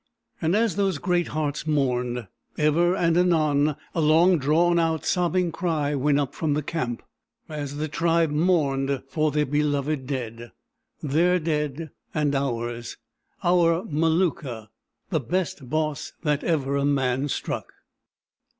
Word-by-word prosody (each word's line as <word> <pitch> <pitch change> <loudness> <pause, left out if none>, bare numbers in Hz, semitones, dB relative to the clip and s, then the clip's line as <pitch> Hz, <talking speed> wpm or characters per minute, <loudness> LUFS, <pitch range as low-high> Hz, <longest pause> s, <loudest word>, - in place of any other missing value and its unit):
And 165 +4 +2
as 220 -4 +1
those 195 -5 +1
great 175 +1 0
hearts 150 0 -3
mourned, 125 -5 0 0.3
ever 165 +4 +3
and 170 -3 +2
anon 155 -4 +3 0.2
a 165 - 0
long 165 +3 +5
drawn 170 +5 +3
out, 160 -1 0
sobbing 180 0 +1
cry 155 -5 -1
went 145 +1 +2
up 140 -3 -2
from 150 -3 -1
the 150 - -1
camp, 125 -7 -3 0.4
as 145 -2 -5
the 155 +1 -2
tribe 165 0 +1
mourned 140 -5 +1
for 155 +2 0
their 150 +1 +1
beloved 145 -1 -1
dead—their 135 +6 -2
dead 150 -1 -2 0.2
and 150 -2 +1
ours—our 135 +7 -1
Maluka, 155 - 0 0.4
"the 160 - +2
best 150 -2 -3
Boss 155 0 -2
that 150 -2 0
ever 140 -5 0
a 140 - 0
man 135 -1 +1
struck." - - -4
150 Hz, 130 wpm, -25 LUFS, 140-165 Hz, 0.4 s, long